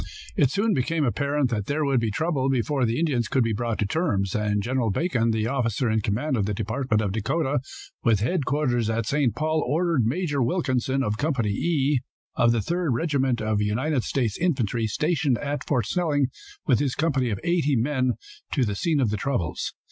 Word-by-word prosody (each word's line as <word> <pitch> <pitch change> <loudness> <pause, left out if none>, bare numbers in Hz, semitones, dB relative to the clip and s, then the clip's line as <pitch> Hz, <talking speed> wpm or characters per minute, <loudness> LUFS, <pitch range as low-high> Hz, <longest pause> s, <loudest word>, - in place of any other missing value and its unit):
It 140 - +4
soon 205 - +1
became 150 +3 0
apparent 140 +1 0
that 105 -3 -2
there 150 +1 0
would 135 -3 +2
be 115 -1 0
trouble 135 - 0
before 135 +1 +1
the 115 - -1
Indians 135 -9 +1
could 130 +3 +2
be 115 -1 0
brought 115 +1 -2
to 105 - 0
terms, 100 - 0
and 105 -1 0
General 125 0 0
Bacon, 115 - +1
the 110 -1 0
officer 115 -2 0
in 110 0 +1
command 125 +9 -1
of 100 -4 0
the 105 - -1
Department 110 +1 0
of 100 - -1
Dakota, 135 - 0 0.4
with 115 -4 +3
headquarters 130 - 0
at 115 0 0
St. 135 -3 +1
Paul, 155 0 0
ordered 160 -1 +1
Major 145 +1 0
Wilkinson 130 -2 0
of 105 -3 -2
Company 130 -9 0
"E," 140 +2 +1 0.3
of 120 -1 +3
the 115 -1 +1
Third 170 - 0
Regiment 135 -5 0
of 110 -1 0
United 125 +6 0
States 120 -7 -1
Infantry, 120 - 0
stationed 150 +2 +1
at 145 0 -4
Fort 125 -8 +1
Snelling, 145 - 0 0.3
with - - +3
his 140 -3 0
company 135 -6 +1
of 105 - -2
eighty 165 -5 +2
men, 130 +1 +1 0.4
to 135 -5 +2
the 105 - -1
scene 155 - 0
of 120 -6 +2
the 105 - -1
troubles. 100 - -2
130 Hz, 195 wpm, -25 LUFS, 110-150 Hz, 0.4 s, It